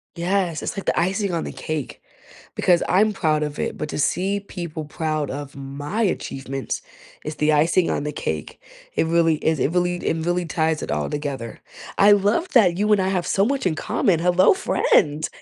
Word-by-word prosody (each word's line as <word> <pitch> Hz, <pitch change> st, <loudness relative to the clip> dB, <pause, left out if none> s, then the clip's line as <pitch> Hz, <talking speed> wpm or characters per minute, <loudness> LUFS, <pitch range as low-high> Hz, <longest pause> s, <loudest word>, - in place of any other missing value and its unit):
Yes, 175 Hz, -1 st, -1 dB
it's -, -, -4 dB
like 195 Hz, -, -4 dB
the -, -, +1 dB
icing 195 Hz, +1 st, 0 dB
on 165 Hz, -, -1 dB
the -, -, -5 dB
cake 155 Hz, -4 st, -5 dB, 0.5 s
because 175 Hz, -2 st, +3 dB
I'm 210 Hz, +3 st, +3 dB
proud 155 Hz, -4 st, +1 dB
of 150 Hz, 0 st, -5 dB
it. -, -, -2 dB
But 150 Hz, -, -4 dB
to -, -, -4 dB
see 190 Hz, +7 st, 0 dB
people 170 Hz, -6 st, -6 dB
proud 155 Hz, -1 st, -2 dB
of 145 Hz, +1 st, -6 dB
my 140 Hz, +9 st, -4 dB
achievements 135 Hz, -, -3 dB, 0.4 s
is 155 Hz, 0 st, -5 dB
the 150 Hz, +1 st, +2 dB
icing 165 Hz, +4 st, +3 dB
on -, -, -1 dB
the 150 Hz, -, -3 dB
cake. 80 Hz, -, -4 dB, 0.4 s
It -, -, +2 dB
really 165 Hz, -1 st, +3 dB
is 160 Hz, 0 st, 0 dB
it 135 Hz, -, +1 dB
really 175 Hz, 0 st, +1 dB
it 165 Hz, -2 st, -2 dB
really 175 Hz, 0 st, 0 dB
ties 160 Hz, 0 st, 0 dB
it -, -, -4 dB
all 75 Hz, -1 st, -1 dB
together. 140 Hz, -6 st, -5 dB, 0.4 s
I 205 Hz, +1 st, +7 dB
love 205 Hz, -, +1 dB
that 185 Hz, -8 st, +5 dB
you 210 Hz, +2 st, +1 dB
and 205 Hz, -2 st, +4 dB
I 190 Hz, -, 0 dB
have 185 Hz, -2 st, -1 dB
so 195 Hz, +1 st, +2 dB
much 275 Hz, -1 st, -1 dB
in 160 Hz, -, 0 dB
common. 200 Hz, -3 st, +1 dB
Hello, 180 Hz, +2 st, +4 dB
friend! 155 Hz, -, +2 dB
170 Hz, 200 wpm, -22 LUFS, 150-190 Hz, 0.5 s, I